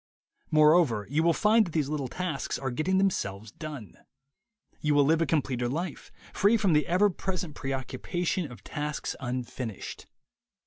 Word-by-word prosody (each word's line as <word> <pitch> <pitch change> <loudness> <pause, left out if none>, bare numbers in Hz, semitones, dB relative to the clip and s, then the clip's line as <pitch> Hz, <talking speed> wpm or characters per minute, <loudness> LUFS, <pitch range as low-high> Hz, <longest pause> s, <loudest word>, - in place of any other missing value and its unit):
Moreover, 150 -8 +4
you 150 +2 +2
will 170 +1 +4
find 215 +6 +4
that 165 - -9
these 155 -4 +1
little 145 -3 -2
tasks 165 0 -3
are 135 -1 -3
getting 170 +9 +1
themselves 110 - -1
done. 145 - -8 0.8
You 150 -1 +1
will 145 - +6
live 160 +3 +3
a 165 - +2
completer 130 -5 0
life, 165 +4 -4 0.2
free 205 +4 +4
from 200 -6 +2
the 150 0 +3
ever 195 +4 +3
present 180 -3 -4
preoccupation 145 +5 -3
of 120 - -12
tasks 150 0 -4
unfinished. 125 -3 -5
150 Hz, 150 wpm, -28 LUFS, 130-175 Hz, 0.8 s, will